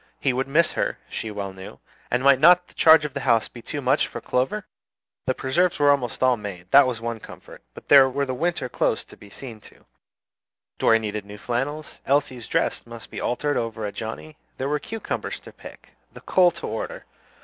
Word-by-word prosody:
He 135 - +1
would 130 +2 -1
miss 155 +4 +3
her, - - -2
she 110 - -4
well 100 -2 -5
knew, 95 0 -10 0.3
and 125 +1 0
might 140 -1 +6
not 180 +4 +6
the - - -20
charge 160 -1 +6
of 145 - -5
the 140 - -3
house 120 -4 +2
be 120 - -12
too 145 +5 -5
much 135 +3 +2
for - - -7
Clover? 135 +12 -1 0.6
The 130 - +1
preserves 170 +7 +1
were 145 -1 +5
almost 130 -3 -1
all 130 -1 +4
made, 95 -4 -8
that 140 -1 +7
was 125 -3 -2
one 115 0 -4
comfort; - - -13
but - - -12
there 135 -2 +8
were 140 +2 -1
the 130 - -3
winter 165 0 -1
clothes - - -1
to - - -15
be 100 - -15
seen 115 0 -9
to; - - -17 0.9
Dorry 115 - +5
needed 105 -2 -4
new 100 +1 -11
flannels, 135 +8 -4
Elsie's 130 -4 0
dresses - - -1
must 115 0 -11
be - - -6
altered 145 +4 -1
over 115 -1 -3
for 105 - -2
Johnnie, 115 +9 -7 0.2
there 130 - -2
were 150 +1 0
cucumbers 225 +9 -5
to - - -13
pickle, - - -14 0.2
the - - -13
coal 180 -1 +4
to - - -8
order! - - -5
130 Hz, 210 wpm, -24 LUFS, 115-145 Hz, 0.9 s, there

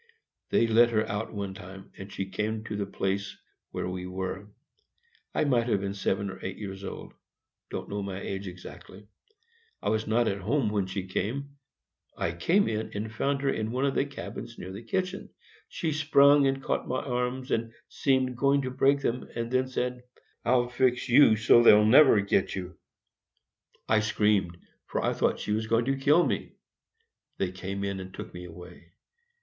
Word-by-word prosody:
They - - +3
let 115 +1 +5
her 110 -1 0
out 105 +2 -3
one 100 -2 -4
time, 95 +1 -11
and 95 0 -10
she 95 - -3
came 105 +3 -3
to 110 -1 -5
the 100 -1 -2
place 100 0 -2 0.3
where - - -4
we 90 0 -5
were. 95 +2 -5 0.9
I - - +2
might 125 -5 +2
have 100 -4 +1
been 100 0 -3
seven 100 0 -1
or - - -11
eight 95 0 -5
years 95 -2 -7
old,—don't - - -10
know 100 0 -3
my 100 -1 -5
age 100 0 -5
exactly. 95 +2 -11 0.7
I - - -2
was 110 0 0
not 115 +2 +2
at 100 0 -2
home 115 +3 +1
when 100 -3 0
she 95 0 -4
came. 130 +9 -3 0.7
I 85 - -1
came 170 - +2
in 110 0 -2
and 110 +2 -4
found 140 +4 0
her 135 - +2
in 110 0 -2
one 130 +3 0
of 140 - +1
the - - +2
cabins 140 - -8
near 95 - -7
the 100 +3 -7
kitchen. 185 +9 -3 0.4
She 160 - -2
sprung 145 -2 +5
and 135 0 -1
caught - - -1
my 130 - -2
arms, 125 0 -2
and 115 0 0 0.2
seemed 130 -2 +1
going 140 +2 +2
to 130 - -3
break 140 +2 +3
them, 125 0 -2
and 115 0 -3
then 130 0 +2
said, 125 -1 -3 0.4
"I'll 120 0 +3
fix 125 0 +1
you 120 -3 +7
so 115 +2 +5
they'll 105 -2 +7
never 125 -1 +7
get 100 -1 0
you!" 90 -1 -6 1.1
I 110 - +4
screamed, 105 -4 +1 0.3
for - - -2
I - - +1
thought - - 0
she - - -3
was 110 +1 0
going 115 +1 +2
to 135 +1 +1
kill 145 +6 +4
me; - - -2 0.8
they 95 -2 -1
came 95 +1 -5
in 100 -1 -2
and 95 0 -8
took - - -9
me 90 0 -8
away. 85 0 -13
110 Hz, 185 wpm, -28 LUFS, 95-130 Hz, 1.1 s, you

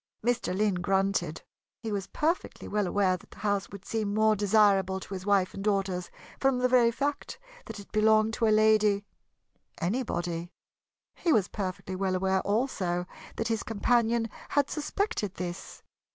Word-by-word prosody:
Mr. 240 -6 0
Lynn 210 -1 +2
grunted. 190 -3 0 0.4
He 220 - -3
was 200 -2 -2
perfectly 330 +4 -2
well 205 -2 0
aware 185 -1 +2
that - - -20
the - - -16
house 205 -2 -1
would 200 -1 -10
seem 215 -2 -2
more 215 0 +4
desirable 200 -2 +3
to 195 - -9
his 190 +1 -6
wife 195 -2 +3
and 195 - -6
daughters 195 -3 0 0.3
from 270 -2 +2
the 250 0 +2
very 250 -2 +5
fact 280 +4 -3 0.3
that - - -7
it 200 - -13
belonged 215 +1 +3
to 225 0 +1
a - - +4
"Lady" 215 -1 +4 0.7
anybody. 175 -5 -2 0.6
He 335 - 0
was 205 -9 +3
perfectly 190 -1 -4
well 190 0 0
aware, 190 0 +1
also, 200 -6 -1 0.3
that 225 - -2
his 225 -1 0
companion 230 +1 +1 0.2
had 285 -1 +1
suspected 300 - -2
this. 175 0 -6
205 Hz, 160 wpm, -28 LUFS, 190-225 Hz, 0.7 s, very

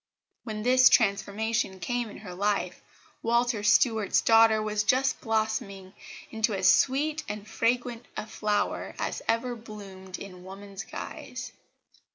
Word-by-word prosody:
When 215 -2 -5
this 255 +1 +6
transformation 200 -1 +1
came 240 +6 -2
in - - -10
her 190 -3 -9
life 195 -1 -1 0.4
Walter 235 -1 +1
Stuart's 215 0 +3
daughter 225 -1 +5
was 215 -1 -1
just 260 +5 +2
blossoming 215 -4 -2 0.4
into 220 -1 0
as 190 -1 +2
sweet 300 +4 +1
and 210 0 -6
fragrant 240 +1 -1
a - - -3
flower 210 -1 -2
as - - -3
ever 240 +2 0
bloomed 195 -4 -10
in 185 -2 -10
woman's 195 +1 -9
guise. - - -7
215 Hz, 130 wpm, -27 LUFS, 200-235 Hz, 0.4 s, this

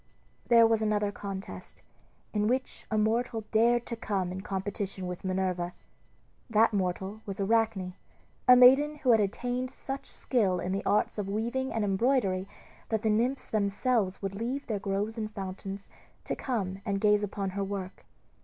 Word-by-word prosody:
There 230 -1 +7
was 225 -1 +3
another 210 -1 +1
contest, 195 -1 -7 0.5
in 210 -1 +1
which 255 +3 -2
a 220 - 0
mortal 225 +1 +1
dared 235 +2 +3
to 235 - -4
come 195 -5 -2
in 185 +1 -5
competition 195 -1 -3
with 180 -1 -5
Minerva. 185 -2 -1 0.8
That 225 0 +4
mortal 190 +2 -2
was 195 0 -5
Arachne, 200 -3 +1 0.5
a 250 - +10
maiden 270 +4 +7
who 270 -4 +2
had 225 - +6
attained 245 +5 -1
such 270 +1 -7
skill 200 -8 +1
in 180 - -2
the 195 +1 -1
arts 210 +1 +2
of 195 -1 -3
weaving 240 +6 -1
and 225 - -1
embroidery 195 -2 +1 0.4
that 220 -2 0
the 220 - +3
nymphs 245 +6 +1
themselves 205 -1 0
would 195 0 -2
leave 240 +7 -3
their 215 -3 -2
groves 200 +3 -2
and 215 -1 -2
fountains 195 0 -6 0.3
to - - -3
come 195 -7 -3
and 200 -1 -1
gaze 210 0 +4
upon 200 -1 -3
her 200 +1 -2
work. 195 -1 -5
210 Hz, 165 wpm, -29 LUFS, 195-230 Hz, 0.8 s, a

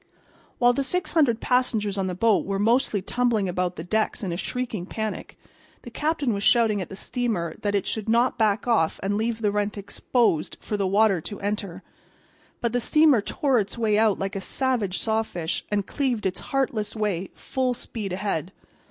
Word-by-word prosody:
While 245 0 +5
the 275 - 0
six 360 +7 -1
hundred 275 -9 +3
passengers 225 -5 +1
on 195 -1 -1
the 180 - -3
boat 220 +2 +3
were 195 0 -2
mostly 220 -1 +2
tumbling 235 -3 +1
about 180 0 -1
the 160 - -6
decks 215 +4 -1
in 185 - -2
a - - -2
shrieking 220 -2 -3
panic 220 0 -5 0.5
the - - -9
captain 300 -5 0
was 200 - -2
shouting 220 -2 +4
at 180 - -6
the 195 - -7
steamer 195 -7 -2
that 205 -1 0
it 200 - 0
should 220 0 -3
not 235 +3 +3
back 220 -1 +1
off 220 -9 +2
and 200 +1 0
leave 225 +1 -1
the 205 - +3
rent 205 0 -1
exposed 200 -3 0
for 210 - -4
the 200 -2 0
water 200 -2 +3
to 205 - -7
enter. 200 -3 -3 0.8
But 235 -1 0
the 245 - +2
steamer 300 -2 +4
tore 265 +4 +1
its 200 +2 -3
way 220 -2 +2
out 220 -3 +3
like 195 +2 -3
a 195 - -3
savage 235 -4 -1
sawfish 220 -7 -2
and 205 -2 0
cleaved 255 -6 -1
its 190 -1 -1
heartless 235 -6 -1
way, 200 -4 -1
full 255 -2 -1
speed 215 -4 -6
ahead. 185 -3 -2
215 Hz, 190 wpm, -25 LUFS, 195-240 Hz, 0.8 s, While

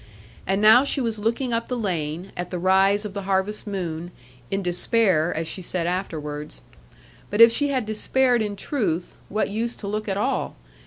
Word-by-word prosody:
And 195 +2 +1
now 220 +4 +8
she 280 0 0
was 230 -4 -2
looking 235 +3 -1
up 230 0 -1
the 250 - -2
lane, 175 -4 -3
at 175 0 -4
the 180 - -3
rise 195 +3 +3
of 205 - -5
the 200 - -4
harvest 195 +3 0
moon, 175 -4 -4 0.4
in 195 0 -2
despair, 180 -1 +2
as 160 +1 -3
she 185 - -4
said 175 -1 -2
afterwards. 150 - -4 0.7
But 205 - -2
if 230 0 +9
she 290 +5 +1
had 260 -5 -1
despaired 245 +3 +1
in 210 -1 -2
truth, 195 - -2
what 215 -1 -1
use 230 +3 -2
to 200 - -8
look 215 +1 -3
at 195 - -1
all? 205 - -1
200 Hz, 190 wpm, -24 LUFS, 180-225 Hz, 0.7 s, if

